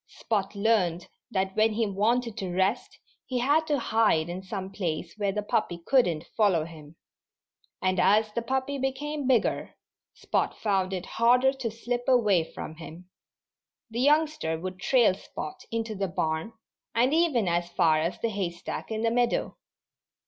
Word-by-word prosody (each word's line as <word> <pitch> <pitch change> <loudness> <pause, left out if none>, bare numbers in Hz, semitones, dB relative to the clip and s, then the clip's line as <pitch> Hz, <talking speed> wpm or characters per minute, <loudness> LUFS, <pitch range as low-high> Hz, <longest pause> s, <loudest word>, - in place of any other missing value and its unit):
Spot 205 -3 -2
learned 200 -5 +1 0.2
that 190 -1 -1
when 220 0 +3
he 225 +1 +1
wanted 220 +3 0
to 185 -2 -3
rest 190 +7 0 0.3
he 255 - -2
had 290 +6 +2
to 295 -2 +2
hide 220 -9 +2
in 180 +2 -5
some 190 0 -6
place 170 -3 -3
where 205 -2 0
the 210 +1 -3
puppy 205 -4 -1
couldn't 175 - +2
follow 190 -8 +3
him. 155 -2 -12 0.9
And 185 0 +1
as 215 +1 +3
the 235 - -1
puppy 265 +3 -2
became 275 +2 -2
bigger 255 -4 +1 0.4
Spot - - -1
found 195 -3 0
it 185 -1 -3
harder 250 +3 +3
to 260 -4 -3
slip 240 +2 -3
away 215 -9 +4
from 160 - -7
him. 170 +2 -11 0.8
The 235 +2 -2
youngster 295 - +2
would 185 +1 -6
trail 240 -2 +4
Spot 155 -5 -8
into 225 -1 -2
the 195 -1 -2
barn 165 +2 -2 0.4
and 250 +5 +3
even 310 - +2
as 175 0 0
far 160 -2 +3
as 165 +3 -2
the 230 - +1
hay 195 -4 -2
stack 170 0 -7
in 220 0 -3
the 230 - +2
meadow. 240 0 0
210 Hz, 165 wpm, -27 LUFS, 180-245 Hz, 0.9 s, away